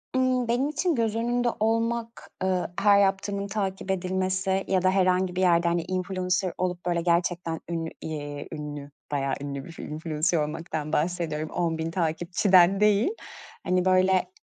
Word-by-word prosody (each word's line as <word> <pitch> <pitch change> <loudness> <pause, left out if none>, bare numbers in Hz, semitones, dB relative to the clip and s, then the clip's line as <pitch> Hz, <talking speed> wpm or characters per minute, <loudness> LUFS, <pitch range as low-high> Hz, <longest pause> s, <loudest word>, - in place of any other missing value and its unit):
Imm, 255 -2 +2
benim 250 +5 +1
için 315 +2 0
göz 225 -2 0
önünde, 240 +1 0
ııı, - - 0
olmak, 230 +1 -1 0.5
her 205 -1 +5
yaptığımın 200 0 0
takip 195 -2 -2
edilmesi 190 +1 0
ya 190 -2 +2
da 185 - +3
herhangi 185 -1 +2
bir 185 - 0
yerde, 170 -1 +4
hani 170 0 +1
influencer 185 0 -1
olup 180 -1 -2
böyle 175 -1 +1
gerçekten 170 -1 0
ünlü, 165 -1 -2
iii, 145 -2 -5
ünlü, 145 -1 -6 0.2
bayağı 135 -1 0
ünlü 140 -1 -5
bir 165 - -12
influencer 155 +2 -1
olmaktan 155 0 -3
bahsediyorum, 155 -2 -1
10.000 165 -1 -1
takipçiden 175 +3 +3
değil. 210 - +4 0.5
Hani 180 0 +1
böyle 185 - +3
185 Hz, 145 wpm, -26 LUFS, 165-200 Hz, 0.5 s, her